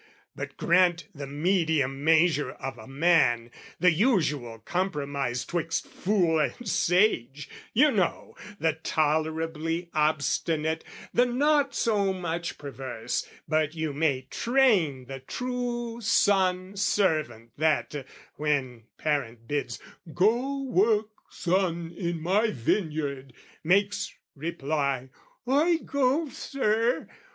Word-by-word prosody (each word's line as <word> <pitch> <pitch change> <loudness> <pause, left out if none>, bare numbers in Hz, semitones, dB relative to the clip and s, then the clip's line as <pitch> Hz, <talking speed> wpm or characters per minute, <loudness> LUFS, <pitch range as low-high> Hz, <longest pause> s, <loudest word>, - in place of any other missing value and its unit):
But - - -6
grant 175 -1 +3
the 140 -3 -7
medium 150 -3 0
measure 160 -1 +3
of 135 - -7
a - - -11
man, 135 -5 +2 0.3
The 180 0 +5
usual 155 - +1
compromise 140 - -2
'twixt 165 -1 -2
fool 180 -5 +1
and 150 - -2
sage, 165 - +2 0.2
You 290 +6 +5
know 190 -7 -1 0.2
the 160 -1 +2
tolerably 160 +2 -1
obstinate, 155 +1 0 0.3
The 245 +1 +4
not 285 +3 +2
so 200 -4 +1
much 170 -2 -4
perverse 130 -4 -4 0.2
but 155 0 +1
you 160 -2 -2
may 140 -3 +1
train, 190 - +2
The 135 +1 -7
true 240 - -4
son 190 -3 +2
servant 155 - 0
that, 150 -2 +1 0.3
when 135 -6 -1
parent 120 -7 -2
bids 145 +1 -2 0.4
"Go 245 +8 +2
work, 215 -3 +2 0.2
son, 170 -2 -1
in 170 -2 -2
my 200 +7 +2
vineyard!" 140 - -2 0.3
makes 200 +5 +2 0.2
reply 140 -4 -2 0.4
"I 310 +6 +3
go, 280 +3 +1
Sir!" 235 -3 0
165 Hz, 105 wpm, -27 LUFS, 145-205 Hz, 0.4 s, The